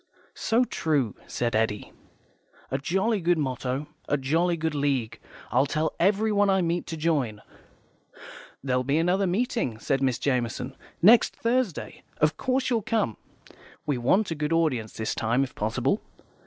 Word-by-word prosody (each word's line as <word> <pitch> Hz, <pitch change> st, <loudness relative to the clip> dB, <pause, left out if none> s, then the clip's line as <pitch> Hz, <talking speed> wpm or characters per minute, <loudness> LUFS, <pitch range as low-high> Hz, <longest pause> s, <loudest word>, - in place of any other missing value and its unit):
"So 230 Hz, +3 st, +2 dB
true," 145 Hz, -, 0 dB
said 120 Hz, -2 st, -1 dB
Eddy. 110 Hz, -2 st, -1 dB, 0.8 s
"A 135 Hz, -, 0 dB
jolly 195 Hz, +8 st, 0 dB
good 175 Hz, 0 st, +2 dB
motto. 130 Hz, -1 st, -2 dB, 0.2 s
A 145 Hz, -, +2 dB
jolly 165 Hz, +6 st, +1 dB
good 160 Hz, -1 st, -1 dB
League. 140 Hz, -6 st, -1 dB, 0.3 s
I'll 130 Hz, +5 st, +3 dB
tell 155 Hz, +3 st, -1 dB
everyone 205 Hz, +2 st, +3 dB
I 190 Hz, -1 st, +3 dB
meet 170 Hz, +1 st, -1 dB
to 165 Hz, -, -5 dB
join." 145 Hz, -10 st, 0 dB, 1.2 s
"There'll 130 Hz, -2 st, +1 dB
be 140 Hz, +4 st, +1 dB
another 180 Hz, +4 st, +2 dB
meeting," 195 Hz, -, -1 dB
said 135 Hz, +4 st, -1 dB
Miss 130 Hz, -3 st, +1 dB
Jamison, 125 Hz, 0 st, -1 dB, 0.3 s
"next 225 Hz, +4 st, +6 dB
Thursday. 235 Hz, -6 st, -1 dB, 0.2 s
Of 155 Hz, +1 st, +2 dB
course 260 Hz, 0 st, 0 dB
you'll 230 Hz, -2 st, +2 dB
come. 210 Hz, -, 0 dB, 0.7 s
We 145 Hz, -4 st, 0 dB
want 190 Hz, -, +2 dB
a -, -, +2 dB
good 150 Hz, 0 st, -2 dB
audience 130 Hz, -10 st, +1 dB
this 110 Hz, -, -2 dB
time, 120 Hz, +4 st, +1 dB
if 130 Hz, -, -5 dB
possible. 120 Hz, -, 0 dB
150 Hz, 150 wpm, -26 LUFS, 130-190 Hz, 1.2 s, next